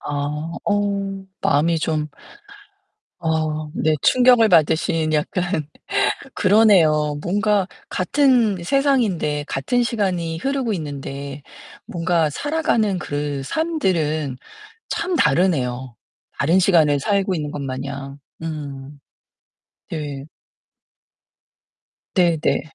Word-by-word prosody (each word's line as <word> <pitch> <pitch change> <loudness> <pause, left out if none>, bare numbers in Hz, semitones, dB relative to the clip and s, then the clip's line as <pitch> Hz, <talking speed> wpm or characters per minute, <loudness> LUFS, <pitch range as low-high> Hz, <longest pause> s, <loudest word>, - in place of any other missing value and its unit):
아 145 +3 -3
어 200 -1 -1 0.2
마음이 160 +4 +2
좀 155 -1 -1 1.1
아 155 -1 -1
네. 155 0 +1
충격을 245 -3 +5
받으신 160 -1 +2
약간. 155 +1 -1 0.7
그러네요. 170 -8 +4
뭔가 205 +1 +1 0.2
같은 230 - +2
세상인데 205 - +1
같은 240 - 0
시간이 185 -8 -1
흐르고 265 -1 -1
있는데 140 -3 -6 0.4
뭔가 165 -2 0
살아가는 225 - 0
그 145 -3 -3
삶들은 165 - -1 0.6
참 355 +1 -1
다르네요, 130 - +1 0.4
다른 165 +7 +3
시간을 160 -6 +4
살고 195 +3 +1
있는 150 -3 -3
것마냥, 140 0 -5 0.2
음. 145 -3 -7 0.9
네. 145 -4 -5 1.9
네 175 -4 +3
네. - - +1
165 Hz, 185 characters per minute, -21 LUFS, 145-200 Hz, 1.9 s, 충격을